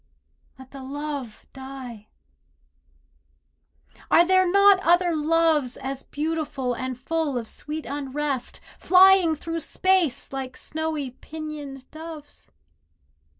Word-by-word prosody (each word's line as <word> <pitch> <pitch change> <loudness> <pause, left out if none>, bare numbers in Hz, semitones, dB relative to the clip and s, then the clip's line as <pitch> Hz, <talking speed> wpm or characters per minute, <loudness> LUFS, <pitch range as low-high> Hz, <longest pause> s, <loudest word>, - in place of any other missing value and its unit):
Let 260 0 -14
the 275 - -9
love 280 -3 -6
die. 265 -5 -9 2.0
Are 340 - +6
there 370 0 +4
not 400 0 +6
other 350 -1 +3
loves 310 -4 +2
As 270 0 -5
beautiful 295 -4 -2
and 255 +1 -4
full 300 0 -1
of 230 -2 -4
sweet 305 +6 -7
unrest, 280 -1 -3 0.2
Flying 370 -2 +6
through 330 +2 -4
space 345 -4 +1
like 265 -2 -5
snowy 310 -4 -3
pinioned 295 -2 -8
doves? 315 -2 -8
300 Hz, 105 wpm, -25 LUFS, 265-330 Hz, 2.0 s, Are